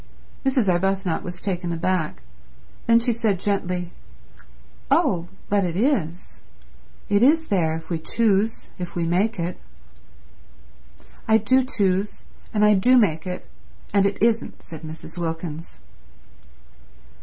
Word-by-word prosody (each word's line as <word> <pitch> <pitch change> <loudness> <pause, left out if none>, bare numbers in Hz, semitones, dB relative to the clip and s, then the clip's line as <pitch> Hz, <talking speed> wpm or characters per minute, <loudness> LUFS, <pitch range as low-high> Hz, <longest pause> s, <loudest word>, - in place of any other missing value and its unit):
Mrs. 260 -5 +2
Arbuthnot 190 0 +1
was 175 0 -7
taken 180 -3 -2
aback. 165 - -1 0.6
Then 230 0 +6
she 235 +1 +2
said 215 -5 0
gently, 180 -3 -1 1.0
"Oh, 195 - +2 0.2
but 205 -1 +2
it 175 -2 -2
is. 190 - -1 0.7
It 205 0 +2
is 315 +5 +4
there 165 -6 +1
if 165 - -11
we 165 - -1
choose, 215 +4 +1
if 180 -1 -6
we 170 -1 0
make 190 +5 +1
it." 175 +1 -3 1.7
"I 220 - +6
do 255 +5 +3
choose, 200 -5 0 0.3
and 210 -1 +3
I 210 - +6
do 245 +6 +5
make 165 -8 +2
it, 180 0 -5 0.5
and 200 -1 +4
it 200 - -4
isn't," 230 -1 0
said 160 -2 -10
Mrs. 160 +2 -8
Wilkins. 165 -1 -5
190 Hz, 130 wpm, -23 LUFS, 175-220 Hz, 1.7 s, Then